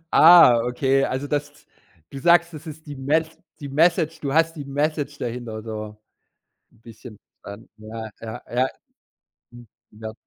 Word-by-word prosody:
Ah, 160 -8 +8
okay. 135 +2 +1
Also, 130 +2 -3
das 145 0 -4 0.4
du 140 - -8
sagst, 170 +3 +3
das 155 +2 -10
ist 155 0 -10
die 145 -1 -8
Mes 155 +4 0 0.3
die 145 - -7
Message 165 +2 +1
du 140 -2 -3
hast 165 +1 +2
die 145 - -6
Message 145 0 -2
dahinter 115 -2 -5
so 110 -1 -7 0.8
'n - - -27
bisschen 115 0 -13 0.2
verstanden. 100 +3 -11
Ja, 110 +1 -8
ja, 110 -1 -7
ja. 130 +2 +2 0.8
Mhm. 120 0 -14 0.3
Ja. 110 0 -6
135 Hz, 150 wpm, -22 LUFS, 115-155 Hz, 0.8 s, Ah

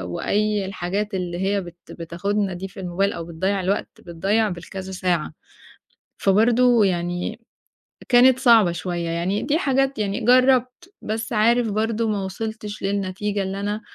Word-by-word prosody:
وأي 210 -1 0
الحاجات 195 +2 -3
اللي 175 -2 -3
هي 195 +1 0
بت 175 -1 -11
بتاخدنا 190 +4 -2
دي 185 +2 -6
في 195 - -12
الموبايل 190 +3 -1
أو 165 - -6
بتضيّع 190 +4 -1
الوقت، 195 +3 -1
بتضيّع 195 +6 0
بالكذا 185 +2 -7
ساعة، 180 -4 -1 0.9
فبرضه 230 +3 +4
يعني 175 +2 -2 0.7
كانت 255 +1 +6
صعبة 230 -8 +5
شوية، 170 -1 -3
يعني 175 +5 -1
دي 285 +3 +1
حاجات 270 -4 +1
يعني 200 -1 -1
جرّبت، 255 - +3
بس 220 +2 -4
عارف 230 +1 +3
برضه 220 +2 0
ما 200 -2 -1
وصِلتش 215 +2 -6
للنتيجة 200 +1 -2
اللي 195 +1 -4
أنا، 205 +2 -3
200 Hz, 140 wpm, -22 LUFS, 185-225 Hz, 0.9 s, كانت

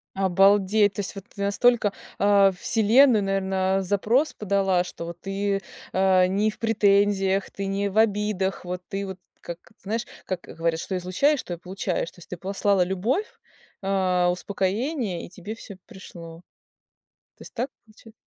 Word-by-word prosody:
Обалдеть, 195 +2 +4
то 205 - -3
есть, 195 - -4
вот 195 - -8
ты 200 - -6
настолько, 210 +1 +3 0.3
э, 200 -1 +5
Вселенная, 225 +1 +4
наверное, 195 0 0
запрос 210 - +1
подала, 195 -3 +1
что 170 -1 -7
ты, 195 +2 -2 0.3
а, 185 -1 +4
не 200 +4 +1
в 215 - -8
претензиях, 200 -3 +2
ты 195 0 -4
не 200 +1 -1
в 195 - -6
обидах. 205 -4 +1
Вот 180 0 -4
ты 195 0 -3
вот, 190 -1 -7 0.2
как, 170 0 -7 0.2
знаешь, 225 +4 -2 0.2
как 185 -2 -3
говорят: 165 0 -2
"Что 190 - -3
излучаешь, 215 +12 +1
то 175 - -6
и - - -6
получаешь". 180 -1 -3
То - - -19
есть 175 - -14
ты 180 - -6
послала 195 +1 +1
любовь, 215 - -1 0.6
а, 185 -2 +2
успокоение, 200 - -2
и - - -12
тебе 185 +4 -8
всё 210 -3 -10
пришло. 170 -3 -11 1.0
То - - -14
есть - - -12
так 250 +3 -2 0.2
получа 220 +1 -18
195 Hz, 160 wpm, -25 LUFS, 185-210 Hz, 1.0 s, э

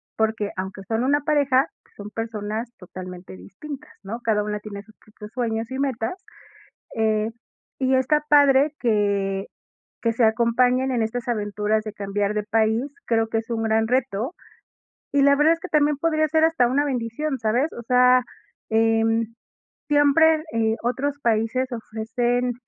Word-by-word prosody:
porque, 220 -2 0
aunque 190 +1 -5
son 225 +1 0
una 285 +3 +2
pareja, 285 -2 +2 0.3
son 205 0 -8
personas 225 0 -4
totalmente 180 - -9
distintas, 270 - -10
¿no?, 215 +4 -5
cada 210 -2 +1
una 210 0 -3
tiene 205 -1 -8
sus 220 0 -21
propios 210 0 -13
sueños 230 -1 -2
y 265 - -4
metas, 260 -3 -1 0.8
eh, 220 0 +1 0.5
y 265 0 +2
está 295 +4 +2
padre 285 0 +5
que 200 -4 0 0.6
que 230 -1 +2
se 230 0 +3
acompañen 245 +3 +2
en 240 -2 +1
estas 235 +2 -3
aventuras 210 -1 0
de 215 - -5
cambiar 200 0 -2
de 210 - -1
país, 220 +3 +1 0.2
creo 225 -1 +1
que 225 - 0
es 225 +1 -6
un 225 -1 -1
gran 220 0 +2
reto, 250 - -1 0.8
y 280 -1 +4
la 280 0 +6
verdad 300 +3 +4
es 330 - -5
que - - -6
también 295 -1 +2
podría 310 0 +1
ser 315 +2 +3
hasta 320 -7 +3
una 280 +4 +1
bendición, 265 +2 -2
¿sabes? 235 +7 +1
O - - -7
sea, 250 +1 +5 0.5
em, 225 0 +2 0.6
siempre, 305 +2 +4
eh, 225 -1 +1
otros 275 +4 -1
países 230 +3 +1
ofrecen 240 +2 -1
230 Hz, 155 wpm, -23 LUFS, 215-265 Hz, 0.8 s, la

